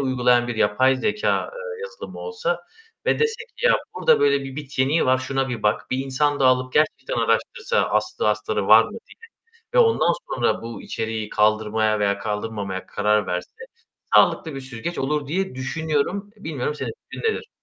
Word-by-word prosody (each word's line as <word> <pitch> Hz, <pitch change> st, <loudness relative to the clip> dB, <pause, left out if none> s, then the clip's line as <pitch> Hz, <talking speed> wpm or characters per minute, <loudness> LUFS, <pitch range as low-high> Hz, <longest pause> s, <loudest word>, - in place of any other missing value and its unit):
uygulayan 125 Hz, -2 st, +2 dB
bir 120 Hz, -, -2 dB
yapay 130 Hz, +6 st, +3 dB
zekâ, 210 Hz, +9 st, 0 dB
eee, 485 Hz, -1 st, -7 dB
yazılımı 480 Hz, 0 st, -8 dB
olsa 475 Hz, +1 st, -2 dB, 0.5 s
ve -, -, +2 dB
dese 450 Hz, 0 st, 0 dB
ki 480 Hz, -, +1 dB
"Ya, -, -, +6 dB, 0.2 s
burada 475 Hz, -, +3 dB
böyle 140 Hz, -1 st, +3 dB
bir 135 Hz, 0 st, -8 dB
bit 145 Hz, -3 st, -8 dB
yeniği 140 Hz, +4 st, +3 dB
var, 130 Hz, 0 st, +4 dB
şuna 135 Hz, +1 st, -1 dB
bir 120 Hz, -4 st, -4 dB
bak, 105 Hz, 0 st, 0 dB
bir 130 Hz, -, 0 dB
insan 145 Hz, +2 st, 0 dB
dağılıp 130 Hz, -1 st, +3 dB
gerçekten 150 Hz, -3 st, +1 dB
araştırsa, 115 Hz, -1 st, +1 dB
aslı 110 Hz, 0 st, 0 dB
astarı 105 Hz, -2 st, -1 dB
var 110 Hz, +1 st, +8 dB
mı?" -, -, -8 dB
diye 460 Hz, -1 st, -13 dB, 0.5 s
ve -, -, +4 dB
ondan 455 Hz, -2 st, +4 dB, 0.2 s
sonra -, -, 0 dB
bu 115 Hz, 0 st, -7 dB
içeriği 110 Hz, -1 st, -4 dB
kaldırmaya 110 Hz, 0 st, +2 dB
veya 100 Hz, -1 st, +1 dB
kaldırmamaya 105 Hz, -3 st, -4 dB
karar 105 Hz, 0 st, +1 dB
verse 90 Hz, 0 st, -3 dB, 0.6 s
sağlıklı 160 Hz, -3 st, +4 dB
bir 135 Hz, -, -5 dB
süzgeç 130 Hz, +6 st, -6 dB
olur 145 Hz, +2 st, -1 dB
diye 190 Hz, +1 st, -1 dB
düşünüyorum. 155 Hz, +8 st, -2 dB
Bilmiyorum 150 Hz, -7 st, -3 dB
senin -, -, -4 dB, 0.2 s
fikrin -, -, -7 dB
nedir? -, -, -7 dB
130 Hz, 170 wpm, -23 LUFS, 110-160 Hz, 0.6 s, var